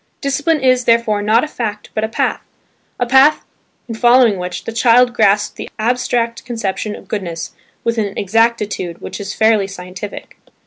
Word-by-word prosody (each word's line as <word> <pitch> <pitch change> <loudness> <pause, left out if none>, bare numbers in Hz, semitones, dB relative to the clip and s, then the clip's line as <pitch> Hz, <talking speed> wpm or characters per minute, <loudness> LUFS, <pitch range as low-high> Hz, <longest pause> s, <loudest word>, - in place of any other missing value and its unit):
Discipline 290 +3 0
is, 255 -2 +3
therefore, 230 -3 +2
not 215 +3 +3
a - - -2
fact 215 -7 -5
but 215 - -2
a - - +1
path, - - -1 0.6
a 245 - +1
path 265 +5 +4 0.4
in 230 - -5
following 240 -3 +4
which 180 -1 -5
the - - -5
child 240 +2 +4
grasps 210 -2 +2
the - - -8
abstract 235 0 -1
conception 215 -3 -3
of - - -13
goodness 175 -6 -4 0.3
with 230 0 0
an 205 -2 -3
exactitude 210 -4 0
which - - -7
is 200 -1 -5
fairly 220 -3 +3
scientific. 185 +1 -9
225 Hz, 165 wpm, -17 LUFS, 205-245 Hz, 0.6 s, path